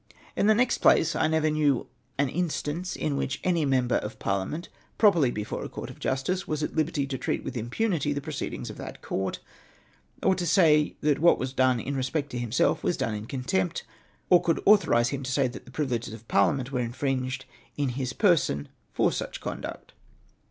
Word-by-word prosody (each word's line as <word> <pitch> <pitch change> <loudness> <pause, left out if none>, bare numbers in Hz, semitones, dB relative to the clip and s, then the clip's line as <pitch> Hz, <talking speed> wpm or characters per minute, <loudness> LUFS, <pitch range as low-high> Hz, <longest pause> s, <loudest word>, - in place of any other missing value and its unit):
In 205 - +2
the 215 - +6
next 245 +2 +2
place 165 0 +4
I - - +2
never 155 -1 +2
knew 145 -4 +2 0.3
an 140 +1 +2
instance 175 +3 -2
in 145 -2 -1
which 135 - -2
any 170 -4 +2
member 130 -3 +2
of 105 - -5
parliament, 100 - -2 0.3
properly 175 - +5
before 105 -3 -4
a - - -6
court - - -7
of - - -15
justice, 180 +9 -1
was 155 -1 -2
at - - -3
liberty 155 -2 0
to 135 -2 -4
treat - - -2
with - - -5
impunity 145 - -1
the 145 - -1
proceedings 145 -1 -5
of - - -11
that - - -8
court, 95 0 -3 0.8
or - - +4
to 175 -2 -2
say 155 -3 +4
that 150 -2 +2
what 170 +3 +5
was 130 0 -4
done 130 -2 +3
in 140 +5 -3
respect 140 +2 -2
to 120 - -3
himself 120 0 +1
was 175 - 0
done 115 - -1
in 105 +1 -5
contempt, 120 -9 -1 0.5
or 180 - +8
that 175 - -12
could 165 - +1
authorise 120 - +5
him 140 0 -3
to 130 -1 -4
say 135 0 +2
that 125 - -9
the 125 - -13
privileges 125 -6 -2
of 115 +1 -15
par 100 -1 +4
liament 135 -1 -4
were 130 - -1
infringed 130 +2 -2 0.3
in 145 -2 0
his 130 0 -3
person 150 - +2 0.2
for - - +2
such - - -4
conduct. - - -6
140 Hz, 200 wpm, -27 LUFS, 125-160 Hz, 0.8 s, or